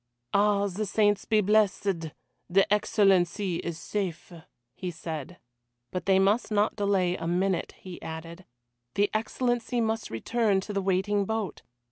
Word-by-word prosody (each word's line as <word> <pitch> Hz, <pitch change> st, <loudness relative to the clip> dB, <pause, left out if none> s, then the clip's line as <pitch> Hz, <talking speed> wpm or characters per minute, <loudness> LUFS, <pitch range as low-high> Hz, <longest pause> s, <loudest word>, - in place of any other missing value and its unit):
"Ah, 205 Hz, 0 st, +3 dB
the 200 Hz, +2 st, -3 dB
saints 205 Hz, 0 st, +2 dB
be 215 Hz, -2 st, +3 dB
blessed, 200 Hz, -5 st, +2 dB, 0.4 s
the 195 Hz, +3 st, +4 dB
Excellency 195 Hz, -3 st, +2 dB
is 170 Hz, -1 st, -4 dB
safe," 180 Hz, -1 st, -4 dB, 0.4 s
he 185 Hz, -, -5 dB
said. 160 Hz, 0 st, -6 dB, 0.5 s
But 180 Hz, -, -4 dB
they 190 Hz, -1 st, +5 dB
must 200 Hz, +5 st, +2 dB
not 210 Hz, 0 st, +2 dB
delay 195 Hz, -4 st, +1 dB
a 165 Hz, -, -4 dB
minute, 180 Hz, +1 st, 0 dB
he 185 Hz, -2 st, -10 dB
added. 165 Hz, +3 st, -8 dB, 0.5 s
The 205 Hz, 0 st, +2 dB
Excellency 240 Hz, +2 st, -1 dB
must 225 Hz, -1 st, -1 dB
return 210 Hz, -, +1 dB
to 210 Hz, -, -6 dB
the 200 Hz, -, 0 dB
waiting 195 Hz, +2 st, +1 dB
boat! 220 Hz, -4 st, -3 dB
195 Hz, 140 wpm, -28 LUFS, 180-210 Hz, 0.5 s, they